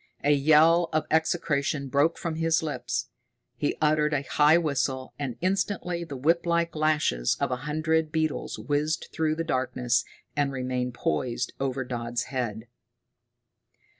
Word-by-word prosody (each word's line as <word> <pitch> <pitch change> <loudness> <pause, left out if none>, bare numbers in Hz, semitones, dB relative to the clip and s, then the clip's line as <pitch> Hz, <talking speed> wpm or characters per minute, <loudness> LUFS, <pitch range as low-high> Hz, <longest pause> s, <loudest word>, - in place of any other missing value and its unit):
A 145 - +4
yell 155 +4 +5
of 155 - +1
execration 150 -3 +1
broke 145 +5 +2
from 165 - -3
his 165 0 +2
lips. 155 - -3 0.5
He - - -1
uttered 150 0 +2
a 140 - -1
high 150 +3 +4
whistle, 135 -5 -1
and 130 -5 -4
instantly 185 -2 -1
the 145 -5 -7
whiplike 170 +4 +1
lashes 150 - +1
of - - 0
a 125 - 0
hundred 155 +1 +1
beetles 155 -2 -1
whizzed 150 +2 -1
through 155 -1 0
the 165 - -2
darkness 125 -4 0 0.3
and 145 -1 +1
remained 125 -1 -2
poised 120 +7 -1
over 135 -1 -1
Dodd's 120 -1 -3
head. 115 -3 -3
150 Hz, 135 wpm, -27 LUFS, 130-160 Hz, 0.5 s, yell